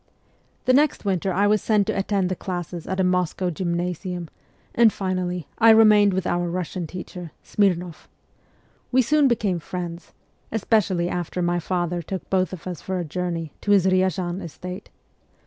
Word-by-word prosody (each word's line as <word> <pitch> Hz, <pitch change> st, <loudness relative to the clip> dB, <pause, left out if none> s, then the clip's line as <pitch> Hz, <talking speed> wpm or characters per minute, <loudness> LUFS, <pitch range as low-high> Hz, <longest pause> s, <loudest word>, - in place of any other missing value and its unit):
The 255 Hz, -, +4 dB
next 290 Hz, -3 st, +2 dB
winter 190 Hz, -1 st, 0 dB
I 195 Hz, +3 st, +2 dB
was 210 Hz, -1 st, +3 dB
sent 210 Hz, -2 st, +2 dB
to 215 Hz, -, -1 dB
attend 195 Hz, -1 st, 0 dB
the 185 Hz, -, -1 dB
classes 175 Hz, -2 st, -5 dB
at 190 Hz, 0 st, -2 dB
a -, -, +3 dB
Moscow 180 Hz, 0 st, 0 dB
gymnasium; 175 Hz, 0 st, -3 dB, 0.4 s
and 230 Hz, -2 st, +5 dB
finally 185 Hz, -3 st, -3 dB
I 225 Hz, 0 st, +7 dB
remained 210 Hz, -3 st, +6 dB
with 190 Hz, -1 st, -1 dB
our 175 Hz, 0 st, 0 dB
Kussian 180 Hz, -1 st, -3 dB
teacher, 180 Hz, -1 st, -8 dB
Smirnoff. 180 Hz, -5 st, 0 dB, 0.8 s
We 260 Hz, 0 st, +4 dB
soon 295 Hz, +4 st, +4 dB
became 210 Hz, -7 st, 0 dB
friends, 175 Hz, +1 st, -6 dB, 0.4 s
especially 200 Hz, -5 st, +1 dB
after 180 Hz, 0 st, -3 dB
my 175 Hz, 0 st, +1 dB
father 175 Hz, 0 st, -2 dB
took 185 Hz, +3 st, -6 dB
both 185 Hz, -1 st, +2 dB
of 185 Hz, -4 st, -8 dB
us 180 Hz, -3 st, -5 dB
for 190 Hz, -1 st, -3 dB
a 175 Hz, -, -2 dB
journey 165 Hz, -1 st, -3 dB
to -, -, -5 dB
his 200 Hz, -3 st, +5 dB
Ryazan 185 Hz, -1 st, +1 dB
estate. 180 Hz, +3 st, -8 dB
185 Hz, 165 wpm, -23 LUFS, 175-200 Hz, 0.8 s, I